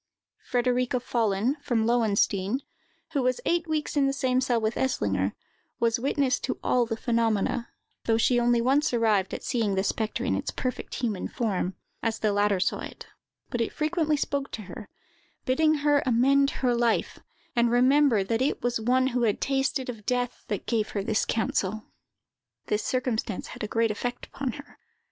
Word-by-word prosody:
Frederica 250 0 +1
Follen, 230 +2 0
from 235 -6 0
Lowenstein, 220 -1 +1 0.5
who 285 -4 0
was 255 0 +1
eight 340 0 +1
weeks 310 -1 -2
in 280 -2 +3
the 275 - 0
same 260 -2 +1
cell 245 -3 +1
with 220 0 0
Eslinger, 100 - 0 0.5
was 230 0 +2
witness 270 0 +1
to 255 - -3
all 245 -2 +2
the 225 -1 -3
phenomena, 230 0 0 0.4
though 225 -1 +3
she 240 +2 +3
only 240 0 +3
once 270 +2 +2
arrived 215 -5 +2
at - - -5
seeing 225 -6 0
the 190 - +1
spectre 220 +3 -1
in 245 - +1
its 280 - -2
perfect 255 -1 -4
human 220 -6 -2
form, 195 -6 -2 0.3
as 225 -1 -1
the 215 -2 +1
latter 205 -1 +2
saw - - 0
it; - - -8 0.5
but 240 - -1
it 230 - -1
frequently 310 0 0
spoke 280 -1 -2
to 215 - -6
her, 195 +2 -9 0.6
bidding 310 +4 +3
her 290 -1 +4
amend 270 +3 +4 0.2
her 245 - +4
life, 235 -1 +1 0.4
and 235 0 +3
remember 250 -2 +4
that 225 +4 -1
it 275 - 0
was 240 -2 0
one 255 +3 +3
who 245 - +1
had 220 -4 +1
tasted 270 -1 0
of 225 -4 -7
death 245 -1 -1
that 205 -3 -3
give 220 -3 0
her 200 - -2
this 215 +1 +1
counsel. 215 -1 -1 0.8
This 210 - 0
circumstance 245 -6 -2
had - - -7
a - - -1
great 225 +1 +1
effect 245 +3 -4
upon 265 -3 -4
her. 285 0 -12
240 Hz, 175 wpm, -27 LUFS, 220-260 Hz, 0.8 s, her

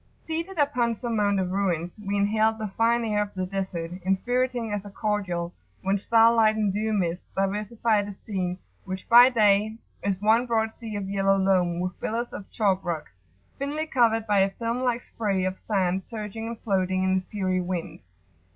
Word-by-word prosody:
[FN#22] - - -33
Seated 335 +3 -3
upon 250 -6 +1
some 235 0 -3
mound 205 -2 +2
of 185 -1 -1
ruins, 180 -1 -1
we 200 0 -1
inhaled 215 +2 +2
[p.85]the 215 -3 -4
fine 230 +2 +2
air 210 -1 +1
of 205 -1 -4
the 185 -1 -1
Desert, 185 -3 -4
inspiriting 245 +4 0
as 205 -1 -2
a 205 - -9
cordial, 195 -5 -2 0.3
when 195 +1 +1
star 230 +3 +5
light 220 -2 +4
and 210 -3 0
dew 215 +2 -1
mists 180 -4 -1
diversified 210 +2 0
a 200 - -7
scene, 185 -4 -2 0.3
which, 190 -1 -6
by 245 +2 +9
day, 215 -2 +3 0.2
is 195 -2 -1
one 225 +4 +3
broad 220 -1 0
sea 225 -3 -7
of 200 -2 -3
yellow 195 0 +2
loam 185 -3 +2
with 180 0 -3
billows 235 +2 -3
of 195 - -8
chalk 195 -3 +1
rock, 170 -4 -4 0.5
thinly 290 +3 -2
covered 230 -6 +2
by 205 -2 +3
a 195 0 +4
film 230 +4 -3
like 245 -2 0
spray 200 -4 -1
of 185 0 -3
sand 190 -3 +1
surging 220 +1 -6
and 230 -1 -6
floating 185 -2 0
in 190 0 +2
the 190 - +2
fiery 185 -3 0
wind. 180 -1 -4
205 Hz, 190 wpm, -26 LUFS, 190-225 Hz, 0.5 s, by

